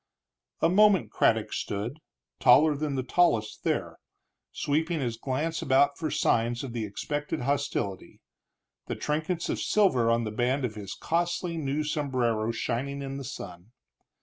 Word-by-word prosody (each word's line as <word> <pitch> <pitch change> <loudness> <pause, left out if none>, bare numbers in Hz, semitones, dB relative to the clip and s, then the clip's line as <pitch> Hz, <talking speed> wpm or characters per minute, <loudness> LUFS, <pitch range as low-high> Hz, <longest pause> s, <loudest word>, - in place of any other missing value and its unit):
A - - +5
moment 200 0 +4
Craddock - - +2
stood, 110 +9 -3 0.4
taller 150 +4 +6
than 145 -1 -2
the 130 - -1
tallest 120 -9 +1
there, - - -1 0.5
sweeping 160 - -1
his 120 -4 -2
quick 115 - -24
glance 160 +5 -1
about 140 +2 +3
for 160 -2 -3
signs 120 -2 +1
of 130 -4 -6
the 115 -2 -2
expected 145 +9 -3
hostility, 135 -8 -2 0.7
the - - -3
trinkets 160 +3 -2
of - - -2
silver 130 - +3
on 115 0 +2
the 110 - -3
band 125 +4 0
of 115 - -4
his 100 -2 -7
costly 170 +1 -1
new 150 -1 -1
sombrero 125 -7 0
shining 135 +4 -3
in 135 0 -5
the 140 - -6
sun. 95 -5 -9
135 Hz, 150 wpm, -28 LUFS, 115-155 Hz, 0.7 s, taller